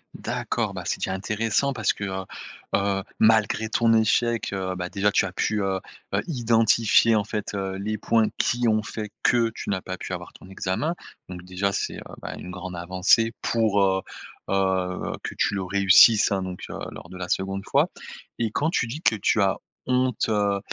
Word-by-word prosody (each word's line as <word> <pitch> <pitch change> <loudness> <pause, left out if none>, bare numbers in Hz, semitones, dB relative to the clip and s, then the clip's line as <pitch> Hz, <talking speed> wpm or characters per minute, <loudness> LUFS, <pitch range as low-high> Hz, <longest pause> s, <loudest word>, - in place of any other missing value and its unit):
D'accord, - - -2
bah - - -6
c'est - - 0
déjà 95 - -2
intéressant 110 +7 0
parce 110 -6 +1
que, 100 - -7
heu, 95 0 -3 0.5
heu, 100 -1 0 0.2
malgré 110 0 +3
ton 115 0 +3
échec, 115 +1 +2
heu, 95 -1 -2
bah, 90 0 -4
déjà 100 +1 +1
tu - - +3
as 95 - -4
pu, 105 +2 0
heu, 95 -1 0 0.4
heu, - - +2
identifier 115 -4 +3
en 105 - +2
fait, 105 0 -4
heu, 95 -1 -3
les 105 +2 -3
points 115 0 +3
qui 120 0 +1
ont 110 -1 +3
fait 105 -1 -6
que 115 -2 +3
tu - - -6
n'as 95 -2 -1
pas 95 0 -6
pu - - -6
avoir - - -6
ton 95 - -15
examen, 95 - -2 0.3
donc 90 -1 -8
déjà 95 +2 -1
c'est, - - -3
heu, - - -8 0.2
bah - - -5
une 90 - -8
grande 90 0 -7
avancée 95 +6 +2
pour, 110 -3 +2
heu, 95 0 +2 0.5
heu, 95 -1 0
que - - -6
tu - - +1
le 95 - -1
réussisses, 100 +3 +6
hein, 95 - 0
donc 90 -1 -6
heu, - - -6
lors - - -11
de 90 - -9
la 90 -1 -5
2de 95 +1 -1
fois - - +2 0.5
et 115 -2 +1
quand 155 +7 0
tu 120 - 0
dis 145 +8 -6
que 110 - +4
tu 105 +1 +2
as 95 - +1 0.3
honte, 125 -2 +1
heu, 100 -2 +1
100 Hz, 200 wpm, -25 LUFS, 95-115 Hz, 0.5 s, réussisses